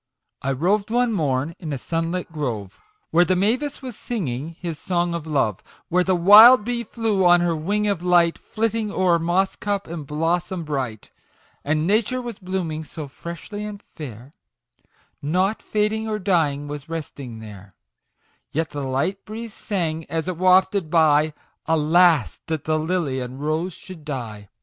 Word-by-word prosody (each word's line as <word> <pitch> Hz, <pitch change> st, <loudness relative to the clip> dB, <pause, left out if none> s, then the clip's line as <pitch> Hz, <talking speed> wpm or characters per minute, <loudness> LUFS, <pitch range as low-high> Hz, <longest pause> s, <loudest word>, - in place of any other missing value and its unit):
I 135 Hz, -, -1 dB
roved 190 Hz, +10 st, +1 dB
one 240 Hz, 0 st, +2 dB
morn 145 Hz, -3 st, 0 dB
in 160 Hz, -4 st, -5 dB
a 140 Hz, -, -2 dB
sunlit 165 Hz, +5 st, -3 dB
grove, 115 Hz, -, -4 dB, 0.3 s
Where 175 Hz, +2 st, +5 dB
the 185 Hz, +1 st, +1 dB
mavis 250 Hz, +10 st, 0 dB
was 250 Hz, -4 st, -6 dB
singing 160 Hz, -, -4 dB
his 165 Hz, -4 st, -5 dB
song 175 Hz, -1 st, 0 dB
of 165 Hz, -2 st, -4 dB
love, 135 Hz, -10 st, 0 dB, 0.3 s
Where 180 Hz, +1 st, +3 dB
the 185 Hz, 0 st, +2 dB
wild 210 Hz, +6 st, +9 dB
bee 240 Hz, 0 st, -1 dB
flew 220 Hz, -4 st, 0 dB
on 175 Hz, -1 st, +6 dB
her 175 Hz, -1 st, +1 dB
wing 205 Hz, +7 st, -1 dB
of 200 Hz, -5 st, 0 dB
light, 175 Hz, -2 st, +3 dB
Flitting 220 Hz, -1 st, -2 dB
o'er 180 Hz, -3 st, +2 dB
moss 175 Hz, +4 st, +1 dB
cup 205 Hz, -1 st, -2 dB
and 160 Hz, -4 st, -7 dB
blossom 170 Hz, +4 st, -1 dB
bright! 130 Hz, -8 st, -4 dB, 0.5 s
And 155 Hz, +2 st, 0 dB
Nature 220 Hz, +6 st, +1 dB
was 240 Hz, -4 st, -6 dB
blooming 180 Hz, -4 st, -3 dB
so 155 Hz, 0 st, -8 dB
freshly 170 Hz, +8 st, -7 dB
and 210 Hz, -1 st, -7 dB
fair, 130 Hz, -2 st, -9 dB, 0.9 s
Nought 185 Hz, +8 st, 0 dB
fading 215 Hz, +1 st, -1 dB
or 215 Hz, -, -1 dB
dying 160 Hz, -8 st, +1 dB
was 145 Hz, +1 st, -7 dB
resting 140 Hz, -7 st, -6 dB
there; 105 Hz, -3 st, -11 dB, 0.8 s
Yet 160 Hz, +1 st, -1 dB
the 145 Hz, -1 st, -4 dB
light 140 Hz, +9 st, -1 dB
breeze 220 Hz, +1 st, -7 dB
sang, 165 Hz, -8 st, -2 dB
as 165 Hz, +1 st, -2 dB
it 185 Hz, -, -2 dB
wafted 185 Hz, 0 st, +3 dB
by, 155 Hz, -2 st, +4 dB
" -, -, -46 dB
Alas 160 Hz, -1 st, +3 dB
that 160 Hz, -2 st, -2 dB
the 155 Hz, 0 st, 0 dB
Lily 155 Hz, -5 st, -1 dB
and 125 Hz, +1 st, -6 dB
Rose 155 Hz, +5 st, -1 dB
should 180 Hz, -3 st, -11 dB
die 115 Hz, -9 st, -6 dB
170 Hz, 165 wpm, -23 LUFS, 150-195 Hz, 0.9 s, wild